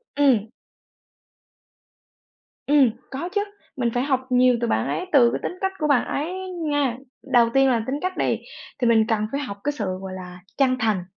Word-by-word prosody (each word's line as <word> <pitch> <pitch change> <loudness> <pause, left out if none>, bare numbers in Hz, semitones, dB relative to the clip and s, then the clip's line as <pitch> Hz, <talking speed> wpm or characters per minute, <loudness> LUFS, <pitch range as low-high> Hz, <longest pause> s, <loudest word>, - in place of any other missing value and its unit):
Ừm. 255 -7 +3 2.2
Ừm, 280 -4 +5 0.2
có 280 +7 -4
chứ, 405 +2 0 0.4
mình 240 -2 +1
phải 245 - 0
học 265 -2 0
nhiều 250 -1 +4
từ 235 - 0
bạn - - 0
ấy, 365 - -2
từ 245 -5 +6
cái - - -2
tính 360 - -4
cách 385 0 0
của 305 - +1
bạn 285 -4 +3
ấy 310 +6 -2 0.4
nha. 280 -5 0 0.4
Đầu 235 -2 +6
tiên 270 0 +5
là 235 -3 +1
tính 265 - -1
cách 370 0 -3
đi, - - +1 0.4
thì 245 - +3
mình 225 -2 +4
cần 220 -2 +1
phải 280 - -2
học 200 -8 -6
cái 290 - +1
sự, 250 -8 -4 0.2
gọi 190 -1 -6
là, 180 -1 -9 0.2
chân 265 -2 +3
thành. 215 -5 +1
255 Hz, 195 wpm, -23 LUFS, 230-285 Hz, 2.2 s, từ